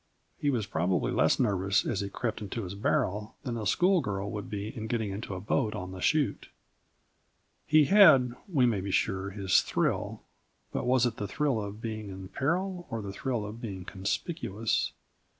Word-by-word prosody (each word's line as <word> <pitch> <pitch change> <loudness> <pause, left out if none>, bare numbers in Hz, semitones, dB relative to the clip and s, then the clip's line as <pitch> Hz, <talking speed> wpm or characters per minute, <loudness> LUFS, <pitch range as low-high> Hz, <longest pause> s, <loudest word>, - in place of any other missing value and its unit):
He 145 - +1
was 120 -7 0
probably 90 -1 0
less - - +3
nervous 100 -4 +2
as 105 -5 -1
he 100 - -3
crept 110 +2 -3
into 105 +2 -4
his 90 0 -5
barrel 105 +1 -1
than 125 -4 -3
a 110 -3 -2
schoolgirl 105 - +2
would 105 -3 -5
be 105 +1 -4
in 110 -1 -4
getting 110 -3 -1
into 100 0 -5
the - - -4
boat 105 +3 0
on 90 0 -5
the 95 -1 -8
chute. 155 - +1 1.2
He 155 -1 +6
had 135 -9 +7 0.2
we 135 -7 +4
may 110 -5 +1
be 100 - -4
sure, 95 0 0
his 95 -2 +3
thrill, - - -1 0.5
but - - -2
was 125 -1 +4
it 120 -2 -1
the 105 - -3
thrill 135 0 0
of 105 +1 -6
being 110 -2 -4
in 95 -1 -8
peril 175 - -1
or 115 -3 -3
the 100 -1 -5
thrill 120 -1 -2
of 110 +3 -8
being 95 -5 -6
conspicuous? 105 - -1
110 Hz, 185 wpm, -29 LUFS, 100-125 Hz, 1.2 s, had